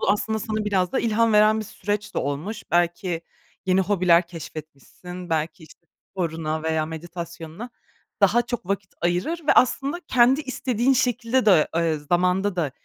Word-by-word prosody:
Bu - - +2
aslında 220 +1 0
sana 215 0 -3
biraz 190 -3 0
da - - +1
ilham 230 0 +2
veren 215 +1 +5
bir - - -5
süreç 205 +1 -4
de - - 0
olmuş. 150 +11 -3
Belki 175 0 0 0.5
yeni 185 +1 +3
hobiler 180 -3 +3
keşfetmişsin, 170 +2 -10
belki, 160 +2 -2
işte, 170 +2 -17 0.2
sporuna 160 -3 -3
veya 160 -1 0
meditasyonuna 170 +5 -8 0.5
daha 240 - +4
çok 240 -5 -5
vakit 200 0 -3
ayırır 180 - 0
ve - - +6
aslında 275 +6 +2
kendi 255 +3 +4
istediğin 260 -2 0
şekilde 245 -1 +1
de, 180 -7 +5
eee, 165 -2 +1
zamanda 180 +5 +1
da 155 -5 0
185 Hz, 155 wpm, -24 LUFS, 165-220 Hz, 0.5 s, ve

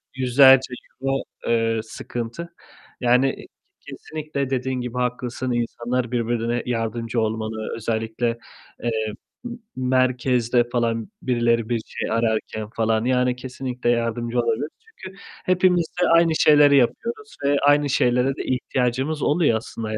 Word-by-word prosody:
yüzlerce 130 0 +5 0.3
euro, 135 -1 0 0.2
eee, 115 -1 +1
sıkıntı. 120 +9 -6 0.5
Yani 125 +2 +2 0.4
kesinlikle 150 -3 -5
dediğin 130 -1 -1
gibi 125 0 -5
haklısın, 125 0 -2
insanlar 120 +1 -2
birbirine 120 0 -1
yardımcı 115 0 -2
olmalı. 110 0 -3
Özellikle, 115 +1 -2 0.5
eee, 110 -2 -1 0.3
m 240 0 -6 0.2
merkezde 125 -1 +2
falan 115 - -1
birileri 120 -2 +1
bir 115 -2 0
şey - - -5
ararken 110 -1 -1
falan 110 0 +1
yani 125 -1 +2
kesinlikle 125 -1 -4
yardımcı 120 0 0
olabiliriz 115 +5 0 0.2
çünkü 190 - -12 0.3
hepimiz 180 -2 +3 0.2
de - - +3
aynı 170 0 +5
şeyleri 145 -2 +6
yapıyoruz 235 - -1
ve 140 0 +3
aynı 145 0 +4
şeylere 125 0 +2
de - - -5
ihtiyacımız 130 +3 -1
oluyor 145 -7 +2
aslında 110 0 -6
yani. 110 - -2
125 Hz, 125 wpm, -23 LUFS, 115-135 Hz, 0.5 s, şeyleri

